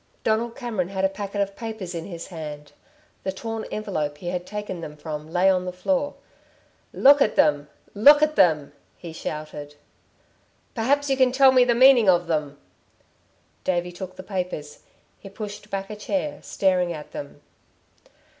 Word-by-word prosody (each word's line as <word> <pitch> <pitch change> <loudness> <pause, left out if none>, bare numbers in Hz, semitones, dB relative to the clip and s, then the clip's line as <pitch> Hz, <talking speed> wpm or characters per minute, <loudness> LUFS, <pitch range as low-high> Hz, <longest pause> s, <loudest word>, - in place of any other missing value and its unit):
Donald 230 +2 0
Cameron 230 -9 -3
had 190 0 -1
a - - +3
packet 200 +1 -4
of 200 0 -2
papers 220 -6 -6
in 165 -1 -5
his 170 -2 -8
hand. 150 -4 -8 0.5
The 190 - -2
torn 225 +3 -5
envelope 155 -9 -3
he 175 +3 -5
had 180 0 -4
taken 205 -4 -5
them 150 -2 -8
from 150 0 -7
lay 180 +2 +3
on 185 -1 +3
the 180 - -3
floor. 275 +10 -1 0.8
"Look 285 +1 +6
at 215 - +3
them... 145 -1 +3 0.3
look 290 +8 +7
at 305 0 +2
them!" 155 - +3 0.2
he 170 -2 -9
shouted. 150 -2 -6 1.0
"Perhaps 275 +5 +1
you 270 - +2
can 260 -1 +4
tell 265 +1 +6
me 255 -1 +6
the 240 -1 +2
meaning 250 -4 +7
of 175 -1 +4
them." 150 -4 -2 1.1
David 175 -1 -1
took 185 0 -7
the 185 - -9
papers. 180 -6 -5 0.4
He 195 - -11
pushed 210 +1 -8
back 195 0 -4
a - - -5
chair, 285 +7 -3
staring 180 -2 +1
at 150 -3 -8
them. 145 0 -8
190 Hz, 165 wpm, -24 LUFS, 165-225 Hz, 1.1 s, look